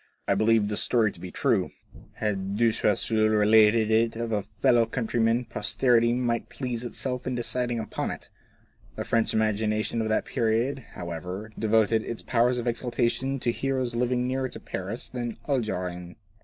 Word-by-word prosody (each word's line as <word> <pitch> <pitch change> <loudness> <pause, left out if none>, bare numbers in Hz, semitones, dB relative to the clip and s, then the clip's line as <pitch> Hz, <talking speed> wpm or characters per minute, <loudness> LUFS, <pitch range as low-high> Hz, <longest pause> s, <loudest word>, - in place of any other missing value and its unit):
I - - +3
believe 110 +1 +3
this 105 0 +2
story 110 -4 +2
to - - -12
be 90 - -7
true. - - +1 0.4
Had 100 -2 -2
De 115 0 +4
Choiseul 110 +1 +2
related 110 +1 +4
it 115 +1 +2
of 115 0 -3
a 105 -2 +1
fellow 115 +3 +2
countryman 115 0 0
posterity 120 +2 +2
might 120 -1 -1
please 125 -3 -4
itself 125 +1 -4
in 130 - -1
deciding 120 0 -1
upon 110 - -3
it. - - -8 0.6
The - - -3
French 115 -1 +1
imagination 110 +1 0
of 110 - -2
that 110 - +1
period, 115 +5 0
how 85 -1 -6
ever, 90 +6 -6
devoted 110 0 +3
its 115 - -6
powers 120 +1 +2
of 120 - -3
exaltation 125 +2 -1
to 120 - +1
heroes 130 -1 -1
living 125 +1 0
nearer 130 0 -1
to - - -8
Paris 100 +6 -5
than 120 -1 -4
the 115 - -8
Algerines. 90 -8 -2
115 Hz, 170 wpm, -26 LUFS, 110-120 Hz, 0.6 s, De